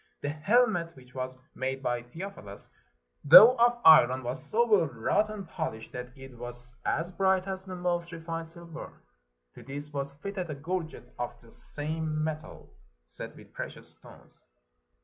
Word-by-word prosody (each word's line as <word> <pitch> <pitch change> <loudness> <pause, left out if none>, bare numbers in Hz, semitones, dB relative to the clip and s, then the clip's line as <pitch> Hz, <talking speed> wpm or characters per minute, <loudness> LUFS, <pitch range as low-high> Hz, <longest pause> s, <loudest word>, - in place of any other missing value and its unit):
The 145 - -2
helmet, 170 +2 +2
which 130 -1 -17
was 130 0 -5 0.2
made 135 +1 -3
by 120 -1 0
Theophilus, 120 - -9 0.6
though 220 - +10
of 240 +1 +4
iron, 130 -5 +7
was 125 +2 -4
so 235 +2 +2
well 210 -8 +4
wrought 140 - 0
and 205 -4 -7
polished, 135 -10 -5
that 125 +1 -8
it 135 -1 -11
was 120 +1 -7
as 165 +4 -1
bright 190 0 +2
as 190 0 -5
the 185 -1 -6
most 175 -1 -2
refined 165 0 -5
silver. 170 0 -10 0.5
To - - -13
this 145 +2 -7
was 140 0 -3
fitted 185 +4 -5
a 150 - -4
gorget 165 +3 -5
of 120 0 -4
the 115 -1 -18
same 155 +1 -3
metal, 155 0 -6 0.3
set - - -8
wdth - - -16
precious - - -7
stones. - - -15
155 Hz, 160 wpm, -29 LUFS, 130-180 Hz, 0.6 s, though